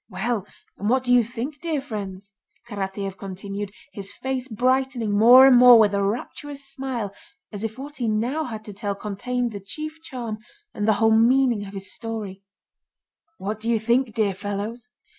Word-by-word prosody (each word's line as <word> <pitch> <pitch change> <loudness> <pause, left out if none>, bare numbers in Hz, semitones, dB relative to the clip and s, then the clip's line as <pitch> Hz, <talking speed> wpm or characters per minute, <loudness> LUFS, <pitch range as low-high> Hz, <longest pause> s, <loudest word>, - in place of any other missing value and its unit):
Well, 205 +1 -2 0.3
and 205 - -1
what 255 +1 +3
do 245 -1 +2
you 245 -1 +6
think, 255 +6 -6
dear 325 -4 -1
friends?" 200 -6 -7 0.3
Karatáev 195 -2 -4
continued, 195 +1 -5 0.2
his 200 -2 -6
face 260 -1 -3
brightening 255 -1 0
more 245 +5 +9
and 265 -2 +7
more 245 -1 +9
with 210 -2 +4
a 200 - +1
rapturous 275 +7 -4
smile 245 -7 -4 0.4
as 205 -1 -6
if 220 +1 -4
what 285 +2 -8
he 240 -3 -1
now 240 +9 0
had 220 -3 -7
to 210 - -8
tell 200 0 -3
contained 240 +5 -3
the 205 - -6
chief 310 +11 -7
charm 235 -8 -6 0.3
and 210 - -2
the 220 - +5
whole 220 +2 +3
meaning 235 -2 +3
of 195 - -10
his 195 0 -6
story: 215 -4 -6 1.0
"What 210 +3 -4
do 225 +2 -3
you 230 -2 +3
think, 235 +1 +1
dear 210 -3 +2
fellows? 205 +5 -5
225 Hz, 180 wpm, -24 LUFS, 205-250 Hz, 1.0 s, more